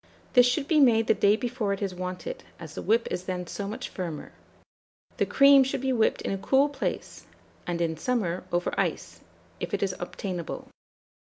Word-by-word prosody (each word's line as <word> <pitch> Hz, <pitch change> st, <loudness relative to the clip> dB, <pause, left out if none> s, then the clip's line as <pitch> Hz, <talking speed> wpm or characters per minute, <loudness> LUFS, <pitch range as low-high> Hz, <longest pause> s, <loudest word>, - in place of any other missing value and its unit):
This 245 Hz, -2 st, +7 dB
should 275 Hz, +3 st, 0 dB
be 315 Hz, -2 st, +3 dB
made 230 Hz, -5 st, +5 dB
the -, -, +4 dB
day 205 Hz, +1 st, +4 dB
before 235 Hz, -3 st, -2 dB
it 195 Hz, -, -5 dB
is 195 Hz, -2 st, -2 dB
wanted, 185 Hz, -, -5 dB, 0.2 s
as -, -, -9 dB
the -, -, -5 dB
whip 230 Hz, +2 st, +2 dB
is 180 Hz, -, -3 dB
then 180 Hz, -1 st, -3 dB
so 200 Hz, +3 st, -5 dB
much 215 Hz, -, -5 dB
firmer. 170 Hz, -5 st, -6 dB, 0.9 s
The -, -, +1 dB
cream 275 Hz, -1 st, +7 dB
should 265 Hz, 0 st, -2 dB
be 265 Hz, -1 st, 0 dB
whipped 225 Hz, -3 st, +1 dB
in -, -, -2 dB
a 195 Hz, -, -2 dB
cool 275 Hz, +7 st, +3 dB
place, 285 Hz, -, -5 dB, 0.4 s
and 175 Hz, -1 st, -2 dB
in 165 Hz, -1 st, 0 dB
summer, 190 Hz, -4 st, -1 dB
over 175 Hz, 0 st, 0 dB
ice, -, -, -2 dB, 0.4 s
if -, -, -2 dB
it -, -, -2 dB
is 190 Hz, -1 st, 0 dB
obtainable. 175 Hz, -1 st, -5 dB
210 Hz, 190 wpm, -27 LUFS, 180-260 Hz, 0.9 s, This